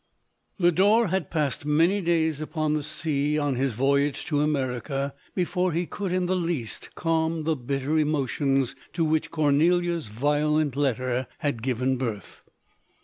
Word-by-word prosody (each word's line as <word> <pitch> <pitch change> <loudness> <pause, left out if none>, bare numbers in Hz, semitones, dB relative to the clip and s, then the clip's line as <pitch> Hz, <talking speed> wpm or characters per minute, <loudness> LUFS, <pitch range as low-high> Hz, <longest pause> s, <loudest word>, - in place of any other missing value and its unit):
Lodork 190 +4 +4
had 190 -6 -1
passed 150 -5 -1
many 165 +7 +2
days 160 -3 +1
upon 155 -1 -1
the 155 - 0
sea, 150 0 -1
on 145 -2 0
his 130 0 0
voyage 140 +4 +1
to 145 -2 0
America, 135 -1 -1 0.2
before 180 -1 0
he 170 +2 0
could 195 +1 -4
in 185 0 +1
the 185 +1 +1
least 165 -10 -3
calm 160 -1 0
the 160 0 +1
bitter 140 +4 -1
emotions 135 -3 0 0.2
to 165 - +1
which 155 0 0
Cornelia's 165 +1 +2
violent 145 +5 +1
letter 130 -2 0
had 140 -6 -2
given 130 +1 0
birth. 115 -5 -5
150 Hz, 145 wpm, -26 LUFS, 135-165 Hz, 0.2 s, Lodork